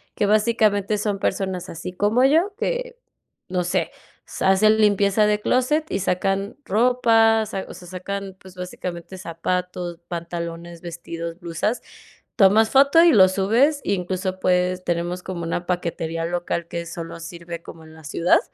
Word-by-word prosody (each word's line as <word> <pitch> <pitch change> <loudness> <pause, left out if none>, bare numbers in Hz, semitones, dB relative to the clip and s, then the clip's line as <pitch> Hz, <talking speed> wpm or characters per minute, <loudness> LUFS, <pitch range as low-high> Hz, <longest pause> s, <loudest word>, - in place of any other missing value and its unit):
que - - +1
básicamente 215 -1 +2
son 205 -1 -2
personas 190 -3 -2
así 180 +2 -7
como 210 +6 +2
yo, 330 +9 +3
que, - - -3 0.5
no 180 -1 -1
sé, 175 - -1 0.3
sa - - -1
hacen 215 +3 +4
limpieza 205 0 +3
de 210 0 +1
closet 295 +8 +1
y - - 0
sacan 195 +2 -1
ropa, 225 -1 +3
sa 195 -2 -5
o - - -9
sea, 180 - -12
sacan, 195 +1 -5
pues 190 -1 -15
básicamente 180 0 -6
zapatos, 175 0 -3
pantalones, 170 0 -6
vestidos, 170 0 -7
blusas. 175 +6 -2 0.6
Tomas 215 +1 +5
foto 280 +5 +6
y 340 - +7
lo 190 -2 +7
subes, 230 +11 +2
incluso, 185 0 -2
pues, 180 0 +1
tenemos 175 +1 -2
como 180 -2 -5
una 175 +1 -3
paquetería 165 -2 -2
local 170 0 -2
que 170 0 -5
solo 165 0 -7
sirve 170 0 -8
como 165 -1 -12
en 160 0 -14
la 160 0 -15
ciudad. 165 +4 +3
185 Hz, 150 wpm, -22 LUFS, 170-215 Hz, 0.6 s, y